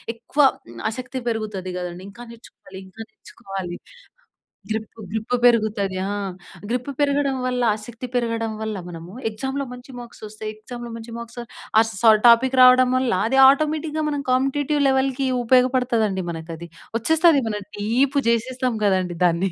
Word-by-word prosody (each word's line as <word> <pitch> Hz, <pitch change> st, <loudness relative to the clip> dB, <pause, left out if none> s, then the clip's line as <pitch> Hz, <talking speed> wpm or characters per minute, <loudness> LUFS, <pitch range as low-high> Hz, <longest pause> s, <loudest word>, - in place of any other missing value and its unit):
ఎక్కువ 235 Hz, +5 st, -8 dB, 0.5 s
ఆసక్తి 255 Hz, +3 st, -5 dB
పెరుగుతది 210 Hz, -5 st, -4 dB
గదండీ. 180 Hz, 0 st, -6 dB
ఇంకా 235 Hz, -, -14 dB
నేర్చుకోవాలి, 225 Hz, -4 st, -13 dB
ఇంకా 190 Hz, +4 st, -12 dB
నేర్చుకోవాలి. 190 Hz, -4 st, -8 dB, 0.9 s
గ్రిప్పు 220 Hz, 0 st, -5 dB
గ్రిప్ 220 Hz, +2 st, -3 dB
పెరుగుతది 215 Hz, -5 st, +2 dB
ఆ! -, -, -2 dB, 0.6 s
గ్రిప్పు 250 Hz, +3 st, -2 dB
పెరగడం 280 Hz, -1 st, +1 dB
వల్ల, 250 Hz, -1 st, -1 dB
ఆసక్తి 230 Hz, +3 st, -8 dB
పెరగడం 230 Hz, -2 st, -1 dB
వల్ల 220 Hz, -1 st, -3 dB
మనము 170 Hz, +1 st, -9 dB, 0.2 s
ఎక్సామ్‌లో 265 Hz, +6 st, -4 dB
మంచి 250 Hz, +2 st, -12 dB
మార్క్స్ 240 Hz, -1 st, -12 dB
ఒస్తాయి. 215 Hz, 0 st, -7 dB
ఎక్సామ్‌లో 240 Hz, +2 st, -9 dB
మంచి 230 Hz, 0 st, -9 dB
మార్క్స్, 235 Hz, +1 st, -9 dB, 0.4 s
ఆ -, -, +7 dB
సా 225 Hz, +2 st, +5 dB, 0.2 s
టాపిక్ 255 Hz, +3 st, +5 dB
రావడం 255 Hz, 0 st, +7 dB
వల్ల, 255 Hz, -1 st, 0 dB, 0.2 s
అది 265 Hz, +3 st, +1 dB
ఆటోమేటిక్‌గా 310 Hz, +2 st, 0 dB
మనం 290 Hz, -1 st, -3 dB
కాంపిటీటివ్ 275 Hz, +3 st, +1 dB
లెవెల్‌కి 265 Hz, 0 st, +1 dB, 0.2 s
ఉపయోగపడతదండి 245 Hz, -5 st, +2 dB
మనకది. 165 Hz, +1 st, -7 dB, 0.3 s
ఒచ్చేస్తది. 320 Hz, +3 st, +4 dB
మనం 210 Hz, -1 st, -4 dB
డీప్ 250 Hz, +7 st, +1 dB
జేసేస్తాం 250 Hz, +1 st, 0 dB
గదండీ 185 Hz, -3 st, +1 dB
దాన్ని. 175 Hz, +2 st, +1 dB
235 Hz, 135 wpm, -22 LUFS, 210-260 Hz, 0.9 s, ఆ